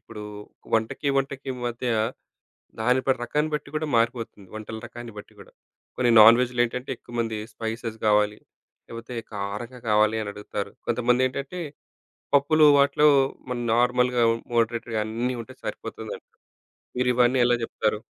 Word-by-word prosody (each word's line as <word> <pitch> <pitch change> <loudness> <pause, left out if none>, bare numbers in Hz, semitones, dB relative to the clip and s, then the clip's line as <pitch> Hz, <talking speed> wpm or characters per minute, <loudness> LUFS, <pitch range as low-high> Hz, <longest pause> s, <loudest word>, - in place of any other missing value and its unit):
ఇప్పుడు 110 -2 -10 0.5
వంటకి, 110 +6 0
వంటకి 135 0 -2 0.2
మధ్య 120 +1 -3 0.9
దాని 125 +3 +3
ప - - +3
రకాన్ని 150 +5 -1
బట్టి 150 -1 -3
గూడా 155 +1 -1
మారిపోతుంది. 115 -4 -1
వంటల 110 +1 -7
రకాన్ని 120 -1 -9
బట్టి 105 - -11
గూడా. - - -15 0.4
కొన్ని 125 -1 +2
నాన్‌వెజ్‌లో 120 +3 +6
ఏంటంటే 125 +2 -5
ఎక్కువమంది 115 -2 -4
స్పైసెస్ 115 +1 -5
గావాలి, 105 0 +3 0.5
లేకపోతే 115 +2 -8 0.2
కారంగా 105 +5 -5
కావాలి 105 +1 +3
అనడుగుతారు. 105 0 -5 0.2
కొంతమంది 125 +2 +2
ఏంటంటే 140 +7 -5 0.7
పప్పులు 150 +2 +5
వాటిలో 140 +2 +4 0.4
మన్ 120 -1 -2
నార్మల్‌గా 125 0 +3 0.3
మోడరేట్‌గా 115 -1 0
అన్నీ 120 +3 -2
ఉంటే 110 - -13
సరిపోతుందంటారు, - - -7 0.6
మీరివన్నీ 125 0 +3
ఎలా 120 0 +3
జెప్తారు? 110 -1 -1
120 Hz, 120 wpm, -25 LUFS, 110-125 Hz, 0.9 s, నాన్‌వెజ్‌లో